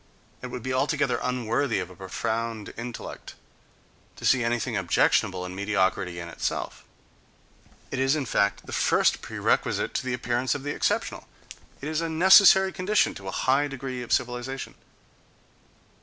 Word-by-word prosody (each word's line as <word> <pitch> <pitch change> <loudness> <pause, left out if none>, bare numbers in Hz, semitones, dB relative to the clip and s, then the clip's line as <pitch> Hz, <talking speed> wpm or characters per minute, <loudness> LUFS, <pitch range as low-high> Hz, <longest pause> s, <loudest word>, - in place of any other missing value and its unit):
It 125 - -5
would 125 -1 -7
be 130 - -2
altogether 140 +1 +1
unworthy 125 0 0
of 95 -1 -4
a - - -13
profound 110 +4 -4
intellect 120 +1 -8 0.8
to - - -8
see 130 -2 +4
anything 115 -1 -1
objectionable 90 -1 +2
in 90 - -7
mediocrity 95 -2 0
in 85 0 -6
itself. 85 - -4 1.1
It 135 - -3
is, 135 +2 +3
in 150 -3 -2
fact, 100 -3 0
the - - -10
first - - +2
prerequisite - - 0
to - - -1
the 130 -1 -1
appearance 120 +2 -1
of 140 - -6
the 145 - -2
exceptional: - - -1 0.5
it 140 - -5
is 155 +1 -1
a 165 - -2
necessary 190 +3 +7
condition 200 +3 +1
to 95 - -10
a - - -3
high 135 +3 +3
degree 130 -2 -5
of 120 - -8
civilization. 125 +1 -2
125 Hz, 155 wpm, -26 LUFS, 105-135 Hz, 1.1 s, necessary